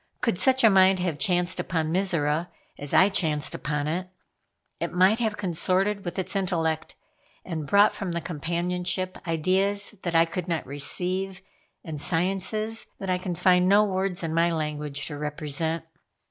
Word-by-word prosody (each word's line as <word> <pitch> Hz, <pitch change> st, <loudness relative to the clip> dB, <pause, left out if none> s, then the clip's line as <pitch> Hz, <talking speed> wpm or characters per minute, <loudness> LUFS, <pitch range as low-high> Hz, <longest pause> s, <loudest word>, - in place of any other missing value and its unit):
Could 230 Hz, -7 st, 0 dB
such 260 Hz, -1 st, +3 dB
a 225 Hz, -, +8 dB
mind 190 Hz, 0 st, +5 dB
have 175 Hz, -5 st, -2 dB
chanced 180 Hz, -2 st, +2 dB
upon 160 Hz, -2 st, -1 dB
Mizora, 170 Hz, -4 st, +1 dB, 0.3 s
as 145 Hz, 0 st, -5 dB
I 190 Hz, -, +6 dB
chanced 160 Hz, -7 st, 0 dB
upon 150 Hz, -1 st, -2 dB
it, 180 Hz, +4 st, -2 dB, 0.7 s
it -, -, -2 dB
might 190 Hz, +5 st, +4 dB
have 220 Hz, -3 st, -1 dB
consorted 195 Hz, +2 st, 0 dB
with 175 Hz, -, -5 dB
its 190 Hz, -, -3 dB
intellect, 165 Hz, -5 st, -1 dB, 0.5 s
and 160 Hz, -5 st, -4 dB
brought 200 Hz, +6 st, +5 dB
from 185 Hz, -4 st, -4 dB
the 170 Hz, -, -1 dB
companionship 180 Hz, +3 st, -2 dB
ideas 190 Hz, +6 st, 0 dB
that 175 Hz, -2 st, -3 dB
I 165 Hz, 0 st, +6 dB
could 170 Hz, +1 st, -5 dB
not 165 Hz, -3 st, -1 dB
receive, 185 Hz, +7 st, -2 dB, 0.4 s
and 155 Hz, -5 st, -6 dB
sciences 195 Hz, +7 st, -1 dB
that 190 Hz, -1 st, -3 dB
I 180 Hz, -, +1 dB
can 180 Hz, -1 st, -3 dB
find 180 Hz, +1 st, +4 dB
no 205 Hz, +2 st, +6 dB
words 190 Hz, -3 st, -1 dB
in 160 Hz, -1 st, -2 dB
my 170 Hz, +1 st, +3 dB
language 150 Hz, -3 st, -3 dB
to 145 Hz, -2 st, -6 dB
represent. 150 Hz, +2 st, -2 dB
180 Hz, 160 wpm, -26 LUFS, 160-190 Hz, 0.7 s, a